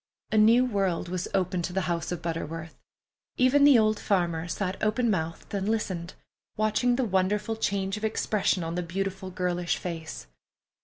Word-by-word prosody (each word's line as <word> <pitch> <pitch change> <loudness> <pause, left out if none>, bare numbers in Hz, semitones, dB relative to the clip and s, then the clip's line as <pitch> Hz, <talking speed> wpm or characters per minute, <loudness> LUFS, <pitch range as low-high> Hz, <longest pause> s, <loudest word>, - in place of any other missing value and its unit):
A 215 - +2
new 230 +4 +6
world 195 -7 -1
was 180 0 -2
opened 185 -2 0
to 180 - -5
the 190 - +1
house 170 -2 -2
of 175 - -4
Butterworth. 165 -1 -4 0.6
Even 255 +3 +4
the 285 -4 +8
old 215 -1 +2
farmer 170 -4 0
sat 185 +2 -3
open 225 +2 +2
mouthed 165 -2 -3
and 200 +1 -1
listened, 185 -6 -2 0.4
watching 215 +3 +2
the 260 0 0
wonderful 205 +2 0
change 200 -2 -1
of 210 - -9
expression 215 -4 0
on 165 0 -3
the 180 - -1
beautiful 190 +2 -3
girlish 180 -1 -1
face. 165 -3 -6
190 Hz, 165 wpm, -27 LUFS, 175-215 Hz, 0.6 s, the